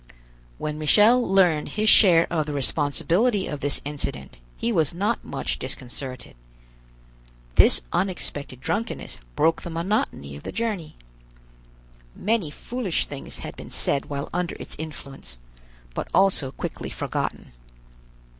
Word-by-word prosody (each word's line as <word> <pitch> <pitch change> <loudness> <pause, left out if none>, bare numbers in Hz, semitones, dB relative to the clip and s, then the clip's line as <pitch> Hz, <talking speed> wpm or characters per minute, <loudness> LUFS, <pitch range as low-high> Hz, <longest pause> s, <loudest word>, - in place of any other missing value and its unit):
When 150 0 -4
Michel 210 +11 +6
learned 180 -7 +3
his 215 +1 +2
share 175 -6 +8
of 155 -3 0
the 150 - -3
responsibility 165 - +1
of 150 - -4
this 145 0 -1
incident, 70 - -5 0.2
he 235 - -1
was 165 -6 +1
not 210 +6 0
much 140 - -3
disconcerted. 130 0 -7 1.2
This - - +7
unexpected 145 -8 -2
drunkenness 215 - -3 0.2
broke 165 +2 +2
the - - -6
monotony 165 - -2
of 70 - -9
the - - -6
journey. 215 -9 -3 1.2
Many 205 -5 0
foolish 215 +4 -2
things 140 -1 -8
had - - -7
been - - -10
said 140 - -1
while 140 -1 -4
under 180 0 -1
its - - -9
influence, 135 - -8 0.6
but - - -3
also 185 -8 +3
quickly - - -5
forgotten. - - -3
160 Hz, 125 wpm, -24 LUFS, 140-195 Hz, 1.2 s, share